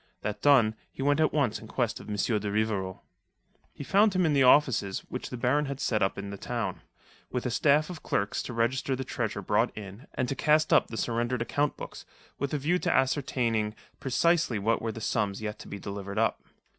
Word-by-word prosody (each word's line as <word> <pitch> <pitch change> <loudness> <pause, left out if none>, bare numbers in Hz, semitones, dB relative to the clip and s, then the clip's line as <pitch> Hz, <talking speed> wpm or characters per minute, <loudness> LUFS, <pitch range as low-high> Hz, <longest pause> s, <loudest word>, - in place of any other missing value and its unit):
That 105 - -4
done, 130 -7 +5 0.2
he 135 - -5
went 145 +1 +3
at 155 - +3
once 140 -8 +1
in - - -11
quest - - -1
of - - -11
M. 105 - -2
de 105 0 0
Rivarol. 100 -3 -1 0.7
He - - -8
found 200 +6 +3
him 185 -1 +3
in 155 - +2
the 140 - +3
offices 125 -7 +4
which 125 - -5
the 125 - -5
Baron 130 +5 +2
had 135 -1 -5
set 110 -6 0
up 95 - +1
in 100 0 -5
the 100 - -7
town, 115 -7 -3 0.5
with 125 0 -3
a 125 - 0
staff 150 +4 +3
of 180 -3 -8
clerks 100 +1 -1
to 125 - -6
register 125 +3 0
the 130 - -4
treasure - - -3
brought - - +1
in 105 +4 -9
and 130 - 0
to 135 - -1
cast 155 +2 +3
up - - +5
the 115 - -7
surrendered 120 +1 -1
account 145 +4 0
books, - - -8 0.4
with 140 0 -2
a 150 - 0
view 165 +6 +1
to 180 - 0
ascertaining 120 -6 +1 0.2
precisely 155 -1 +2
what 110 +3 +1
were 115 - -2
the 115 - -8
sums 100 -2 -1
yet 105 -1 -5
to - - -10
be 100 - -6
delivered 100 +1 -6
up. 110 0 +1
125 Hz, 220 wpm, -28 LUFS, 105-145 Hz, 0.7 s, done